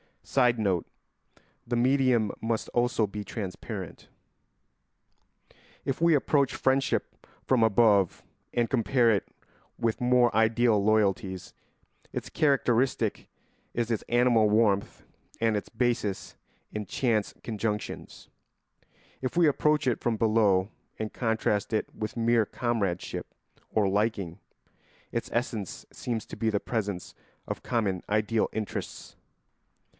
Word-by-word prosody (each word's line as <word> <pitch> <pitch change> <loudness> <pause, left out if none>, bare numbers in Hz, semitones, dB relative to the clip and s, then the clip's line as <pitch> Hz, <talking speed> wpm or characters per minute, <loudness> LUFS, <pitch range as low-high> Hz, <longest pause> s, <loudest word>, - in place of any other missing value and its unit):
[Sidenote: 110 -9 +2 0.8
The - - -1
medium 125 -3 +3
must 115 0 -1
also 120 -2 +1
be 105 +1 -6
transparent.] 100 -3 -6 1.8
If 135 - -2
we 170 -1 +5
approach 140 -1 +2
friendship 135 +1 0 0.2
from 125 -3 +3
above 105 -4 +3 0.3
and 120 -1 +1
compare 120 0 +3
it 100 -4 0 0.5
with 115 +1 0
more 125 -1 +4
ideal 110 -1 +3
loyalties, 100 -3 +1 0.6
its - - -4
characteristic 125 -5 +1 0.5
is 120 0 -1
its 110 - -1
animal 120 -3 +4
warmth 105 -2 +1 0.4
and 115 -1 +2
its 105 - -5
basis 120 -5 -1 0.4
in 105 -1 -4
chance 110 0 0
conjunctions; 105 -2 -4 0.9
if 130 +3 -3
we 170 -2 +5
approach 150 +1 +2
it 125 -3 +1
from 115 -2 0
below 105 -4 +3 0.3
and 110 -1 -4
contrast 110 -3 0
it 110 - -1
with 110 +2 -5
mere 115 -1 +3
comradeship 105 -7 -2 0.3
or 105 -2 +2
liking, 100 -4 -1 0.7
its 115 - -3
essence 115 -5 -3
seems 115 -3 -4
to - - -9
be 110 +1 +1
the 105 -2 +1
presence 100 -6 -3 0.3
of - - -5
common 100 -7 0
ideal 105 +1 +1
interests. 110 -1 -5
115 Hz, 115 wpm, -28 LUFS, 105-120 Hz, 1.8 s, we